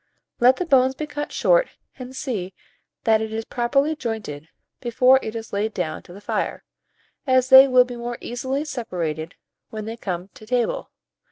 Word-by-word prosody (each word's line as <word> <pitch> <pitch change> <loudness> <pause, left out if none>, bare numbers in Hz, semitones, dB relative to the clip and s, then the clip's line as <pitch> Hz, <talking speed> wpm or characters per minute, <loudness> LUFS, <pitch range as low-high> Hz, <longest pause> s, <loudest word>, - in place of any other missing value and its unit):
Let 250 +2 +6
the 360 - -3
bones 265 -4 +4
be 305 - -4
cut 295 0 -5
short - - +3 0.3
and 255 +1 -8
see 195 -10 -4 0.5
that 220 -1 +3
it 220 0 -4
is 225 0 -4
properly 275 +6 +1
jointed 215 - -5 0.3
before 255 +2 +4
it 220 - -6
is 225 0 -7
laid 210 +2 -1
down 160 -4 -3
to - - -16
the 190 - -10
fire, 205 - -3 0.6
as 255 -1 +3
they 265 0 +10
will 255 -1 +5
be 245 -1 -8
more 240 0 -5
easily 260 +4 -3
separated 175 - -4 0.3
when 215 -1 -6
they 225 +1 -6
come 185 -3 -4
to 215 - -15
table. 250 - -1
240 Hz, 175 wpm, -23 LUFS, 215-265 Hz, 0.6 s, they